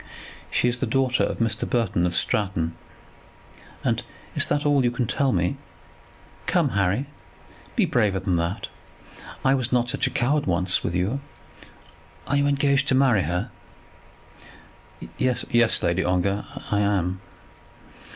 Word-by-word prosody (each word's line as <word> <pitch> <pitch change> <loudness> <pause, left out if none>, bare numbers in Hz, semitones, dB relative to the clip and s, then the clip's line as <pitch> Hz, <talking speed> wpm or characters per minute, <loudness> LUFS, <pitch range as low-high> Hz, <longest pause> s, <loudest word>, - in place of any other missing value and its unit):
"She - - +1
is 120 0 -1
the 130 - -1
daughter 130 +1 +1
of - - -1
Mr. 115 -2 -1
Burton 100 -7 +1
of 85 - -1
Stratton." 85 -3 +1 1.1
"And - - +1 0.3
is - - +1
that 145 - 0
all 145 -1 +4
that 130 - +2
you - - +4
can 120 0 -1
tell 135 +4 +1
me? 90 -3 0 0.9
Come, - - +2
Harry, 100 +7 +1 0.7
be - - +3
braver 105 -6 +1
than 95 -1 0
that. 85 +5 -2 0.8
I 135 - +5
was 130 -3 -1
not 120 -1 +2
such - - 0
a - - -1
coward 145 +3 0
once 90 +1 +1
with 85 - -2
you. 95 +10 0 1.1
Are 140 - -1
you 140 0 +3
engaged 140 -1 +2
to 135 - +3
marry 130 -6 +4
her?" 90 +8 -2 1.7
"Yes, 120 -2 +2
Lady 85 +2 +1
Ongar, 95 +3 0 0.3
I 105 - +2
am." 95 -3 0
110 Hz, 145 wpm, -24 LUFS, 90-130 Hz, 1.7 s, I